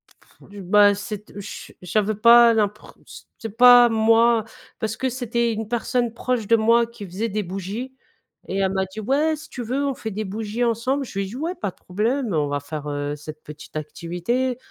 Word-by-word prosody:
Pff, - - -23
du 200 0 -10
bah, 205 +2 +5
c'est 205 +1 -6
te 205 - -11
chu 200 - -9
j'avais 210 +4 0
pas 235 +2 +7
l'impreu 210 -1 -2 0.5
c'est 225 -2 -7
pas 245 0 +8
moi, 225 0 +3 0.3
parce 220 0 -3
que 260 - -1
c'était 235 -2 -1
une 220 0 -4
personne 240 0 -1
proche 240 -2 -2
de 230 - +5
moi 230 +1 +4
qui 230 -3 -10
faisait 195 +5 -3
des 210 +1 -2
bougies 195 +8 -6 0.6
et 195 - -2
elle 190 -1 +1
m'a 190 0 0
dit: 190 +3 -10
«Ouais 290 +8 +1
si 310 - -12
tu 250 - -7
veux 260 +5 -1
on 275 - 0
fait 225 -3 -6
des 210 +2 -3
bougies 215 +4 -3
ensemble». 240 +4 0
Je 195 - -6
lui 195 - -1
ai - - -7
dit 205 - -9
«Ouais 320 +7 -3
pas 205 - -3
de - - -31
problème. 225 +5 -2
On 150 -2 +1
va 145 0 -2
faire, 150 +1 -6
heu, 145 0 -3
cette 155 +1 -10
petite 150 +1 -12
activité. 180 - -2
220 Hz, 210 wpm, -22 LUFS, 195-240 Hz, 0.6 s, pas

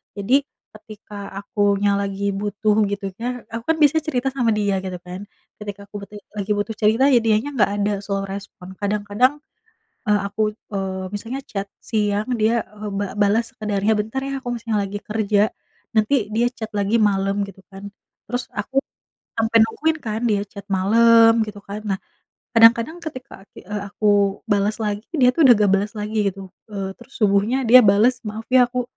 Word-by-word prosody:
jadi 255 +8 +2 0.3
ketika 215 -1 -13 0.2
akunya 200 0 +1
lagi 200 0 -2
butuh 205 +1 0
gitu 200 -1 -4
ya, 245 +1 -4
aku 230 - -4
kan - - -9
bisa 305 +2 +5
cerita 270 -4 -2
sama 245 -4 +1
dia, 200 -2 0
gitu 185 -1 -5
kan. 185 +3 -8 0.3
Ketika 205 -1 -7
aku 205 - -17
butuh 210 - -14 0.2
lagi 200 +1 -2
butuh 205 +2 -2
cerita 220 +5 +3
ya 245 - +6
dianya 225 +4 +1
enggak 205 -3 +3
ada, 205 0 0
slow 195 -1 -2
respond. 195 -1 -8
Kadang-kadang, 210 +5 +1 0.7
eee, 210 0 +3
aku, 210 +2 -4 0.3
eee, 190 -1 -3
misalnya 230 +6 -4
chat 200 -1 -4
siang 210 0 -1
dia, 225 +1 +1
eee, 210 0 -6
ba 205 - 0
balas 210 +3 +1
sekadarnya, 210 0 0
"Bentar 220 +5 -2
ya 275 - -3
aku 245 - -4
masih 230 0 -7
lagi 205 0 -2
kerja," 210 -1 0 0.6
nanti 220 +1 +2
dia 240 +1 +3
chat 220 -3 -6
lagi 205 +2 +1
malem, 195 -1 +2
gitu 195 0 -13
kan. 195 +1 -9 0.4
Terus 245 0 -2
aku 240 +6 -1 0.6
sampai 225 0 +3
nungguin 310 +8 0
kan 220 -1 -3
dia 200 -1 +1
chat 200 0 -11
malem, 225 +4 +5
gitu 210 -1 -8
kan. 205 +2 -7
Nah, 190 - -6 0.6
kadang-kadang 230 +8 +5
ketika 260 -9 -9
ati - - -14
eee, 205 +1 -5
aku 205 -1 +2
balas 205 +1 +2
lagi 210 +1 -3
dia 250 -4 +5
tuh 320 - -1
udah 245 - +9
enggak 205 -2 +2
balas 200 +2 -2
lagi, 210 +1 -4
gitu. 190 -1 -6 0.2
Eee, 195 -2 -4
terus 270 - -16
subuhnya 210 +5 +2
dia 255 +2 +10
balas, 215 +5 +4
"Maaf 215 +2 -5
ya 255 -1 +6
aku 250 0 -2
210 Hz, 175 wpm, -21 LUFS, 200-230 Hz, 0.7 s, dia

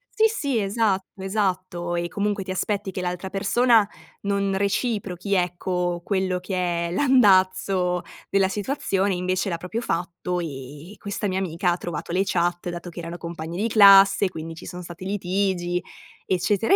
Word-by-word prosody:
Sì, 440 - +4
sì, 285 - -1
esatto, 195 -2 -1
esatto. 185 -3 -1
E 170 0 -1
comunque 205 +2 -1
ti 185 - -5
aspetti 200 +1 -2
che 185 - -4
l'altra 180 +1 -4
persona 220 +2 +3 0.3
non 200 -1 0
reciprochi, 200 -2 -1
ecco, 180 -1 0
quello 190 -2 0
che 180 -2 -1
è - - -6
l'andazzo 185 -6 +3 0.3
della 195 -1 +3
situazione, 200 -2 -1
invece 185 +2 -1
l'ha 170 - -2
proprio 180 +7 -4
fatto, 180 -3 -2
e 145 +1 -7
e - - -17
questa 205 +1 -3
mia 190 -1 -1
amica 180 -1 0
ha 175 - 0
trovato 170 -2 -5
le 185 +2 +2
chat, 175 -2 0
dato 175 0 -6
che 170 - -8
erano 170 +1 -6
compagne 170 -1 -6
di 220 - +1
classe, 200 -2 +7
quindi 165 -2 -7
ci 160 - -10
son 180 0 -7
stati 175 +1 -9
litigi, 185 -2 -1 0.5
eccetera, 195 - +2
185 Hz, 160 wpm, -24 LUFS, 175-200 Hz, 0.5 s, classe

